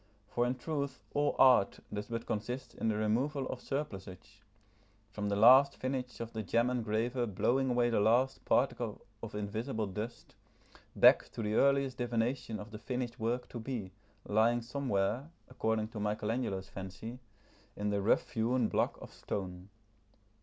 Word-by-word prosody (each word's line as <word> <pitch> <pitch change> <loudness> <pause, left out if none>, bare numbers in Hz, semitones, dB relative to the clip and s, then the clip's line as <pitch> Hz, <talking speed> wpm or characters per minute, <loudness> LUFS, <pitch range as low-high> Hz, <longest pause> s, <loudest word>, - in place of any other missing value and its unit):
For 120 0 +1
in 125 - 0
truth 140 -2 -4
all 145 0 +1
art 125 -7 +5
does 105 0 -4
but 115 0 -4
consist 120 +5 -4
in - - -3
the 110 - +2
removal 130 +7 0
of 125 - -5
surplusage, 100 -7 -6 0.7
from 105 0 -3
the 100 - +1
last 130 +6 +7
finish 130 -1 -3
of 115 0 -6
the 110 - -2
gem 115 +4 +1
engraver 120 +1 0
blowing 130 +6 +1
away 120 -1 +2
the 115 - +2
last 120 +6 +2
particle - - 0 0.2
of - - -7
invisible 110 +3 -2
dust, 105 +5 -6 0.6
back - - +6
to 115 - -4
the 105 0 -1
earliest 140 0 +3
divination 120 -1 -1
of 105 +2 -9
the 105 - -7
finished 120 +2 -4
work 120 +3 -1
to 120 - -6
be, 110 -5 -4 0.3
lying 115 +3 +2
somewhere, 125 0 -1 0.2
according 110 -3 -1
to 115 - -7
Michelangelo's 105 -1 -2
fancy, 95 +7 -8 0.6
in 105 0 -1
the 100 -1 0
rough 100 - +2
hewn 115 +1 +1
block - - 0
of - - -11
stone. 90 -1 -5
115 Hz, 155 wpm, -33 LUFS, 105-125 Hz, 0.7 s, last